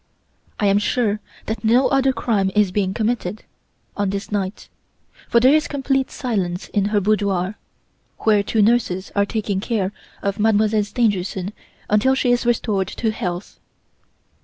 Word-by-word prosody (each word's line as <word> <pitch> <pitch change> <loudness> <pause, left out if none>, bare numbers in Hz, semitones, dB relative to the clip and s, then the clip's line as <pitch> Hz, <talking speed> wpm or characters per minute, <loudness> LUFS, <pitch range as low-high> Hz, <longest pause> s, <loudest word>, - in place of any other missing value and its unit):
"I 210 - +1
am 200 0 +4
sure 210 0 0 0.3
that 220 +2 -4
no 240 +4 +4
other 270 -1 +3
crime 220 -5 0
is 210 -3 +3
being 190 -1 0
committed, 215 -2 -2 0.5
on 205 -1 0
this 200 +2 -4
night; 195 -1 -3 0.6
for 235 - +5
there 260 +4 +5
is 310 0 +3
complete 270 -2 0
silence 190 -8 -3
in 205 -2 +1
the 210 0 +2
boudoir, 200 -1 0 0.6
where 210 -2 +4
two 210 +1 +1
nurses 200 -5 +1
are 200 0 +2
taking 205 -3 -2
care 200 -3 -1 0.3
of 200 +1 -1
Mademoiselle 215 0 +3
Stangerson 200 -4 -1 0.3
until 215 +6 +3
she 255 -2 +1
is 245 0 +1
restored 210 -5 +1
to 220 +3 -2
health. 180 -2 -5
210 Hz, 150 wpm, -21 LUFS, 195-235 Hz, 0.6 s, for